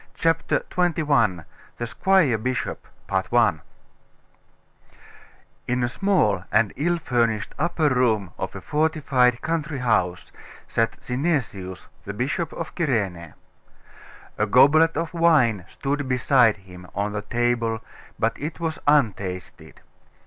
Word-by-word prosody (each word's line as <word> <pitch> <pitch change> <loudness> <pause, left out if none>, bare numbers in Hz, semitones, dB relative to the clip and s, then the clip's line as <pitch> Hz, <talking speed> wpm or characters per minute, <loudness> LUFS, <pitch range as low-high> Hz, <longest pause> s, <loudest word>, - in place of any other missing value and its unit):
CHAPTER 165 0 +1
XXI: 145 - +1 0.3
THE 120 - -3
SQUIRE 155 - +2
BISHOP 125 +3 -3 2.8
In 125 0 0
a - - +2
small 120 - +1
and 110 -2 +2
ill 175 +5 0
furnished 120 -8 -1
upper 160 -1 +1
room 115 -8 +1
of - - -4
a - - -7
fortified 140 -5 +1
country 155 -2 -2
house, 90 -8 0 0.4
sat 115 0 0
Synesius, 125 - -2 0.2
the 100 - -6
Bishop 140 +9 -2
of 165 - -6
Cyrene. 100 - -2 1.0
A 105 - +2
goblet 145 +8 +5
of 165 +1 -3
wine 145 - +3
stood 140 -1 -3
beside 125 -3 +3
him, 90 -2 -13
on 100 +1 -1
the 105 - -2
table, 115 -1 -1 0.3
but 115 - 0
it 155 +4 -5
was 160 -2 -3
untasted. 100 - -1
125 Hz, 115 wpm, -23 LUFS, 105-155 Hz, 2.8 s, goblet